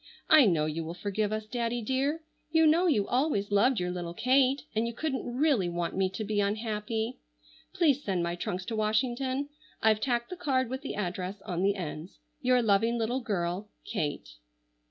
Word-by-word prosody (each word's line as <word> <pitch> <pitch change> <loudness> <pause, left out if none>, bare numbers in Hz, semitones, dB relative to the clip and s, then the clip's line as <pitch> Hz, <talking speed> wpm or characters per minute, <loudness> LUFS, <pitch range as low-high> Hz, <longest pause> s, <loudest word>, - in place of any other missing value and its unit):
I 305 -7 +8
know 160 -5 +2
you 155 +2 -2
will 165 +2 -6
forgive 205 +3 -1
us, 215 0 -2
Daddy 235 +1 -2
dear. 275 +7 0 0.3
You 320 0 +4
know 330 +4 +4
you 210 - +2
always 245 -7 0
loved 215 +5 +3
your 180 0 -1
little 175 -1 -5
Kate 265 +3 +3
and 225 +2 +1
you 235 - -4
couldn't 265 -4 -3
really 270 - +3
want 170 0 -2
me 190 0 +2
to 190 +4 -5
be 210 0 0
unhappy. 220 +2 -2 0.5
Please 290 -5 +2
send 185 -4 0
my 170 0 -1
trunks 185 +1 -4
to 225 - -3
Washington. 255 +6 0 0.3
I've 220 -1 +3
tacked 240 0 -1
the 365 - -5
card 260 -8 0
with 260 +1 -3
the 280 - -5
address 190 0 -4
on 175 -1 -3
the 200 +1 +2
ends. 165 -1 -6 0.2
"Your 250 -1 +3
loving 225 +3 +3
little 240 +3 -1
girl, 195 -2 -2 0.2
"KATE." 145 - -4
220 Hz, 185 wpm, -29 LUFS, 190-260 Hz, 0.5 s, I